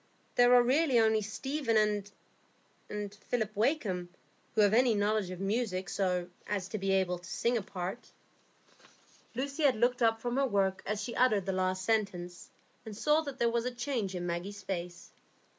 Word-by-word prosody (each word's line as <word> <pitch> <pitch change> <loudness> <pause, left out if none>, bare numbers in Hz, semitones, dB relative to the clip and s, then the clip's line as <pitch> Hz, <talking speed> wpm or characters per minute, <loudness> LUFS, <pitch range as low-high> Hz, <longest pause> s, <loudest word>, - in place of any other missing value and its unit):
There 245 0 +5
are 245 - +7
really 270 +1 +3
only 220 -1 +3
Stephen 215 -3 0 0.9
and 210 -1 -5
Philip 215 0 -3
Wakem 210 - 0 0.5
who 220 - +4
have 205 0 +4
any 240 -1 +4
knowledge 205 -1 +1
of 185 -1 -7
music, 195 -2 -1
so 180 -2 0 0.2
as 195 -3 -2
to 215 - -3
be 195 0 0
able 180 -2 +1
to 180 +1 -12
sing 235 +1 0
a 230 - +1
part." 190 +4 -6 1.2
Lucy 275 +4 -3
had 280 -4 +4
looked 245 +3 +1
up 225 -1 +3
from 240 +2 -2
her 275 0 +3
work 195 -4 +1
as 210 0 -2
she 235 - -5
uttered 215 -7 +3
the 195 - 0
last 185 0 -1
sentence, 180 -5 -1 0.3
and 215 -2 -8
saw 300 +5 +3
that 280 -4 -7
there 235 -2 +2
was 235 0 0
a - - +1
change 240 -6 -2
in 175 -1 -3
Maggie's 185 +4 -4
face. 175 -2 -5
215 Hz, 175 wpm, -31 LUFS, 190-245 Hz, 1.2 s, are